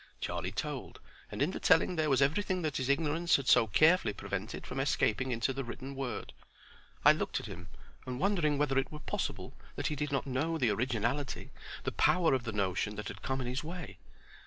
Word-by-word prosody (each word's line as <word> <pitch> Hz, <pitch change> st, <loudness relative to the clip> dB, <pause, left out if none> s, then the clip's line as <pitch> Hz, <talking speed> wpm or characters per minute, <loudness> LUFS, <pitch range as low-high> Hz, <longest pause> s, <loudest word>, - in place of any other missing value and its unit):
Charlie -, -, -3 dB
told, -, -, -5 dB, 0.3 s
and -, -, 0 dB
in -, -, +1 dB
the -, -, -5 dB
telling 180 Hz, -, +4 dB
there 155 Hz, -2 st, +1 dB
was 135 Hz, 0 st, +4 dB
everything 185 Hz, +5 st, 0 dB
that 155 Hz, -3 st, -1 dB
his 130 Hz, 0 st, -2 dB
ignorance 160 Hz, +4 st, +2 dB
had 135 Hz, -2 st, -1 dB
so 115 Hz, -1 st, +6 dB
carefully 155 Hz, -, +4 dB
prevented 100 Hz, +2 st, -5 dB
from 130 Hz, -, -5 dB
escaping 130 Hz, -2 st, +1 dB
into 115 Hz, +2 st, 0 dB
the 135 Hz, +1 st, -3 dB
written 130 Hz, +3 st, -7 dB
word. 135 Hz, -2 st, -4 dB, 0.7 s
I -, -, +10 dB
looked -, -, -1 dB
at -, -, -8 dB
him, 85 Hz, +1 st, -8 dB, 0.4 s
and 125 Hz, 0 st, -4 dB
wondering 170 Hz, -6 st, +2 dB
whether 135 Hz, -2 st, +2 dB
it 135 Hz, -, -3 dB
were 150 Hz, -, -6 dB
possible, 150 Hz, -, -4 dB, 0.2 s
that -, -, -4 dB
he 150 Hz, -, -2 dB
did 150 Hz, +1 st, -2 dB
not 135 Hz, -, 0 dB
know 145 Hz, +5 st, -1 dB
the 125 Hz, -7 st, +2 dB
originality, 120 Hz, +4 st, -1 dB, 0.3 s
the -, -, -1 dB
power 175 Hz, -5 st, +3 dB
of 130 Hz, -2 st, 0 dB
the 110 Hz, -, -2 dB
notion 100 Hz, 0 st, -1 dB
that 105 Hz, 0 st, -5 dB
had 100 Hz, -, -8 dB
come 130 Hz, 0 st, -2 dB
in -, -, -4 dB
his 125 Hz, +4 st, -2 dB
way? 170 Hz, +1 st, -7 dB
135 Hz, 205 wpm, -32 LUFS, 120-155 Hz, 0.7 s, I